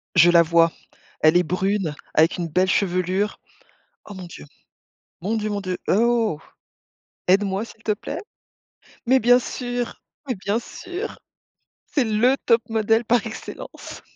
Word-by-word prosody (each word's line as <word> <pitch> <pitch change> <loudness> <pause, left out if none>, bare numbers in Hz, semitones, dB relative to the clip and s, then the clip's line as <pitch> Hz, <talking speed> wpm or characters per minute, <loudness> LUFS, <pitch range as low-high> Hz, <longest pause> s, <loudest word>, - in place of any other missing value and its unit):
Je 175 -1 +7
la 170 -1 +7
vois. 165 0 +4 0.5
Elle 155 +2 +4
est 180 - +4
brune 185 -2 -1 0.2
avec 160 +3 +3
une 175 -2 -2
belle 185 +4 +1
chevelure. 185 +2 0 0.7
Oh 205 - -10
mon 185 -1 -8
Dieu, 150 - -11 0.8
mon 210 +6 -1
Dieu, 215 -1 -2
mon 205 -1 -2
Dieu, 185 -2 -3
oh. 225 -5 +2 0.9
Aide-moi, 195 +2 +2
s'il 225 -1 -15
te 215 - +1
plaît? 205 - -5 0.9
Mais 260 +2 +4
bien 245 +2 +6
sûr, 245 -1 -4 0.2
mais 255 - -1
bien 200 +3 -1
sûr! 365 - -7 0.7
C'est 280 - +1
le 230 +4 +3
top 230 -1 +4
modèle 225 +1 +2
par 235 -1 +2
excellence. 220 - -8
205 Hz, 145 wpm, -23 LUFS, 180-230 Hz, 0.9 s, Je